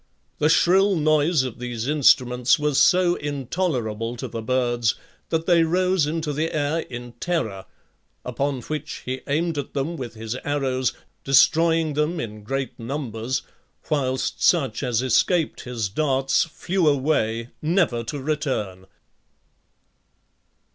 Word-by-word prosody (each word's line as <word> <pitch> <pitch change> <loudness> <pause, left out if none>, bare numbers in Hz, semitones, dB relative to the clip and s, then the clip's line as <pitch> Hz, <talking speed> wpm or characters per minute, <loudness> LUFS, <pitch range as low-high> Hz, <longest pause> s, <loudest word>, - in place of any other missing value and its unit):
The 150 - +3
shrill 190 +4 +4
noise 155 -1 +2
of 125 -2 -6
these 120 -1 -4
instruments 125 -4 +4
was 150 -2 +1
so 180 -1 +4
intolerable 130 - -2
to - - -5
the 115 - -5
birds 120 -1 +1 0.3
that 160 0 -1
they 170 -2 +4
rose 180 0 +2
into 155 -1 -2
the 155 +3 -1
air 150 +2 0
in 120 -5 -7
terror, 110 - -2 0.6
upon 135 +1 -2
which 155 +3 -5
he 130 +1 -4
aimed 155 +2 0
at 145 - -7
them 150 +5 -2
with 120 -4 -6
his 110 +1 -5
arrows, 130 -4 0 0.3
destroying 160 +3 +4
them 150 +4 0
in 105 -4 -6
great 135 +5 -4
numbers, 120 -1 -3 0.5
whilst 130 -3 -1
such 155 -7 +2
as 125 -3 0
escaped 160 - +1
his 120 -4 -2
darts 135 - +1
flew 170 +2 -1
away, 130 -5 +1
never 155 -8 +1
to 145 +5 -4
return. 130 -11 -3
140 Hz, 130 wpm, -23 LUFS, 120-160 Hz, 0.6 s, shrill